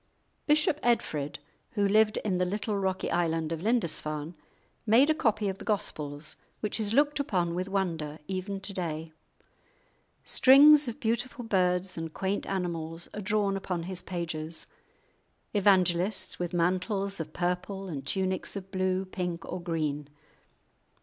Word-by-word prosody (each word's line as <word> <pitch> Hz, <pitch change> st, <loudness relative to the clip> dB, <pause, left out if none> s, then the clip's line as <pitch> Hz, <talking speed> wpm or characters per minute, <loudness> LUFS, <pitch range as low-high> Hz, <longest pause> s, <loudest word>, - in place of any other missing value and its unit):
Bishop 300 Hz, 0 st, +3 dB
Edfrid, 155 Hz, -12 st, 0 dB, 0.4 s
who 205 Hz, -2 st, +2 dB
lived 215 Hz, +1 st, +4 dB
in 185 Hz, -3 st, +1 dB
the -, -, +3 dB
little 205 Hz, +3 st, -1 dB
rocky 190 Hz, -1 st, -1 dB
island 165 Hz, -2 st, 0 dB
of 165 Hz, -1 st, -3 dB
Lindisfarne, 165 Hz, -8 st, -1 dB, 0.5 s
made 245 Hz, +7 st, +5 dB
a -, -, +4 dB
copy 220 Hz, -8 st, +1 dB
of 195 Hz, 0 st, -3 dB
the -, -, -8 dB
Gospels, 150 Hz, -8 st, -2 dB, 0.2 s
which 210 Hz, +1 st, -2 dB
is 210 Hz, -2 st, -1 dB
looked 290 Hz, +4 st, +3 dB
upon 180 Hz, -11 st, 0 dB
with 185 Hz, +2 st, -2 dB
wonder 165 Hz, -6 st, -2 dB
even 195 Hz, +1 st, -3 dB
to 195 Hz, -, -6 dB
day. 160 Hz, -3 st, -4 dB, 1.1 s
Strings 285 Hz, +2 st, +7 dB
of 235 Hz, +3 st, -5 dB
beautiful 240 Hz, 0 st, -1 dB
birds 180 Hz, -3 st, +1 dB
and 165 Hz, -1 st, -4 dB
quaint 195 Hz, +4 st, -2 dB
animals 170 Hz, -3 st, -3 dB
are 210 Hz, -, -5 dB
drawn 205 Hz, -1 st, +1 dB
upon 180 Hz, -3 st, -3 dB
his 185 Hz, +1 st, -3 dB
pages; 165 Hz, -3 st, -2 dB, 0.9 s
evangelists 190 Hz, -1 st, +2 dB
with 175 Hz, -1 st, -2 dB
mantles 185 Hz, +3 st, 0 dB
of 155 Hz, -1 st, -5 dB
purple 180 Hz, +3 st, -2 dB
and 140 Hz, -6 st, -6 dB
tunics 190 Hz, 0 st, -1 dB
of 195 Hz, -1 st, -7 dB
blue, 185 Hz, 0 st, 0 dB
pink, 180 Hz, -3 st, -4 dB
or 180 Hz, -, -5 dB
green. 150 Hz, -4 st, -2 dB
185 Hz, 145 wpm, -29 LUFS, 170-210 Hz, 1.1 s, Strings